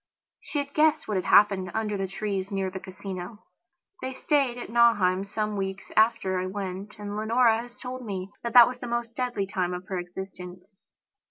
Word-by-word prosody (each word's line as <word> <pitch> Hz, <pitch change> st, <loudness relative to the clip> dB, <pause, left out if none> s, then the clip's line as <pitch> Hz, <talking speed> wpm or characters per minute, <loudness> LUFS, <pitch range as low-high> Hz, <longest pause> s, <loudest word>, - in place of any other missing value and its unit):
She -, -, -6 dB
had 285 Hz, 0 st, -2 dB
guessed 310 Hz, 0 st, +3 dB
what 210 Hz, -, -1 dB
had 185 Hz, -, -2 dB
happened 195 Hz, -3 st, +5 dB
under 215 Hz, -2 st, -1 dB
the 195 Hz, -1 st, -2 dB
trees 195 Hz, 0 st, -3 dB
near 195 Hz, -2 st, -2 dB
the 190 Hz, -, -5 dB
Casino. 190 Hz, +1 st, -8 dB, 0.6 s
They 260 Hz, -, -4 dB
stayed 270 Hz, -3 st, +1 dB
at 240 Hz, -, -7 dB
Nauheim 205 Hz, -6 st, +4 dB
some 210 Hz, +1 st, -2 dB
weeks 195 Hz, -1 st, -4 dB
after 220 Hz, -4 st, +3 dB
I 185 Hz, -, -2 dB
went, 195 Hz, +1 st, -5 dB
and 205 Hz, -1 st, -6 dB
Leonora 225 Hz, +1 st, +3 dB
has 245 Hz, 0 st, -12 dB
told 255 Hz, 0 st, -6 dB
me 195 Hz, -3 st, -5 dB
that 235 Hz, -1 st, -4 dB
that 240 Hz, -2 st, +10 dB
was 250 Hz, 0 st, -5 dB
the 245 Hz, -, -6 dB
most 235 Hz, -1 st, -2 dB
deadly 245 Hz, -6 st, -1 dB
time 180 Hz, -2 st, -2 dB
of 180 Hz, +1 st, -7 dB
her 190 Hz, -2 st, -1 dB
existence. 180 Hz, +1 st, -9 dB
205 Hz, 190 wpm, -27 LUFS, 190-235 Hz, 0.6 s, that